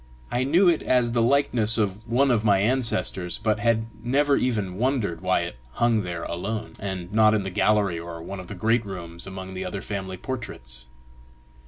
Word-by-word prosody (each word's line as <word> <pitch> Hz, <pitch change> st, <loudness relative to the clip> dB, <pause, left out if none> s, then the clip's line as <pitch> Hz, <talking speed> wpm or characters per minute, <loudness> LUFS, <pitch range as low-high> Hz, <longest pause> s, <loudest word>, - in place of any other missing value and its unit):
I 125 Hz, +1 st, +1 dB
knew 170 Hz, +8 st, +4 dB
it 170 Hz, -3 st, +4 dB
as 125 Hz, -2 st, +2 dB
the 120 Hz, 0 st, +2 dB
likeness 120 Hz, -3 st, +2 dB
of 105 Hz, -2 st, 0 dB
one 130 Hz, +4 st, +3 dB
of 110 Hz, -3 st, +2 dB
my 100 Hz, -3 st, +4 dB
ancestors, 105 Hz, -5 st, 0 dB
but 110 Hz, -1 st, +1 dB
had 115 Hz, 0 st, +2 dB, 0.2 s
never 140 Hz, +4 st, +3 dB
even 105 Hz, -8 st, -1 dB
wondered 115 Hz, -10 st, 0 dB
why 95 Hz, -1 st, +2 dB
it 85 Hz, -7 st, -5 dB, 0.2 s
hung 115 Hz, -, +2 dB
there 85 Hz, -3 st, -4 dB
alone, 105 Hz, +5 st, -4 dB
and 95 Hz, -2 st, -5 dB
not 110 Hz, 0 st, +5 dB
in 105 Hz, -, 0 dB
the 95 Hz, -, -4 dB
gallery, 100 Hz, -3 st, +2 dB
or 85 Hz, 0 st, -7 dB
one 95 Hz, +4 st, -7 dB
of 90 Hz, -, -9 dB
the 105 Hz, -, -7 dB
great 115 Hz, +5 st, +2 dB
rooms, 85 Hz, -4 st, -8 dB
among 95 Hz, 0 st, -7 dB
the 95 Hz, 0 st, -4 dB
other 95 Hz, +2 st, -4 dB
family 95 Hz, -3 st, -5 dB
portraits. 65 Hz, -, -6 dB
105 Hz, 190 wpm, -25 LUFS, 95-120 Hz, 0.2 s, not